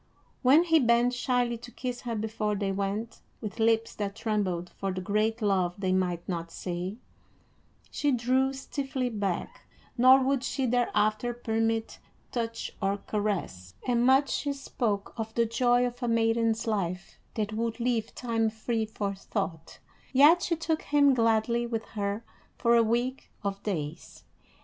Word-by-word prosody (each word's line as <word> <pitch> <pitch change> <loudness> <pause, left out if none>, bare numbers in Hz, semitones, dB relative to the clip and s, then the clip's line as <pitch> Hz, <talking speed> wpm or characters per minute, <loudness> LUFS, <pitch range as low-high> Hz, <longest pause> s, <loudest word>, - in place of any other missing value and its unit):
When 280 +6 +6
he 325 -2 +4
bent 240 -1 +3
shyly 245 -2 0
to 240 +1 -10
kiss 245 0 -5
her 235 -2 -3
before 215 -1 -1
they 200 -1 -1
went, 200 +4 -3 0.2
with 215 +1 -6
lips 225 0 +2
that 200 -1 -3
trembled 195 -6 -1
for 195 -1 -3
the 185 - -3
great 215 +4 0
love 185 -4 +1
they 190 -2 -1
might 180 -2 0
not 170 -2 -3
say, 180 +4 -4 0.9
she 290 - +1
drew 260 +2 +2
stiffly 270 -1 -3
back, 200 -6 -3 0.3
nor 260 +2 +8
would 270 0 +1
she 265 0 -1
thereafter 235 -1 +1
permit 225 -1 -1 0.3
touch 230 -1 -3
or 195 0 +1
caress, 195 - -3
and 240 -1 +2
much 265 +2 +4
she 285 -1 -1
spoke 230 -7 -2
of 220 -1 -5
the 235 - +3
joy 245 +2 +3
of 245 +1 -5
a 240 - -1
maiden's 230 0 +2
life 185 -5 -3 0.2
that 215 -1 -2
would 230 +2 -2
leave 235 -2 -1
time 225 -2 0
free 220 0 -2
for 205 -2 -3
thought; 190 -4 -4 0.3
yet 295 +6 +6
she 340 - 0
took 320 -1 -1
him 285 -1 +4
gladly 230 0 +2
with 225 -1 -3
her 205 +1 -3 0.3
for 235 -1 +3
a 235 - +6
week 240 +4 -1
of 200 0 -3
days. 165 -5 -5
225 Hz, 155 wpm, -28 LUFS, 205-245 Hz, 0.9 s, nor